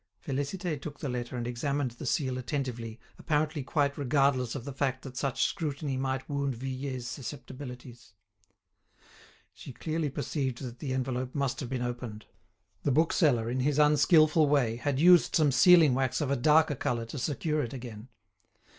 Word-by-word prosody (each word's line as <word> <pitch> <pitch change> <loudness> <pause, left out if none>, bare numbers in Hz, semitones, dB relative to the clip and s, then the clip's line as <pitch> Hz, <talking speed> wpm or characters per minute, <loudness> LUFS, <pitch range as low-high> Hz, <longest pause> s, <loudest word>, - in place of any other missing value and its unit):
Félicité 145 +3 -3
took 145 -1 -7
the - - -4
letter 125 0 -4
and 120 - -3
examined 130 +2 -2
the 120 - -8
seal 130 -5 0
attentively, 120 -4 -4 0.2
apparently 150 -1 0
quite 140 +1 0
regardless 135 -3 +1
of 130 - -6
the 140 - -6
fact 130 -1 -1
that 130 -2 -9
such 135 +1 -1
scrutiny 145 -5 -2
might 130 0 -2
wound 140 -2 -2
Vuillet's 130 0 -5
susceptibilities. 125 -3 -8 1.4
She - - -10
clearly 155 +4 -2
perceived 135 -2 -3
that 120 -1 -7
the 140 - -4
envelope 130 0 -3
must 140 -3 -1
have 130 - -5
been 130 -2 -2
opened; 120 -3 -5 0.6
the - - 0
bookseller, 145 -5 +2
in 125 +2 -2
his 140 +2 +1
unskilful 150 +1 +5
way, 125 -6 +2
had 135 +2 -1
used 175 +1 +6
some 150 -3 +4
sealing 160 +2 +6
wax 130 -1 0
of 145 -3 -1
a - - +3
darker 150 +4 +4
colour 120 -3 -2
to 130 +5 -7
secure 150 +3 -1
it 120 - -4
again. 120 -3 -8
135 Hz, 165 wpm, -29 LUFS, 125-145 Hz, 1.4 s, used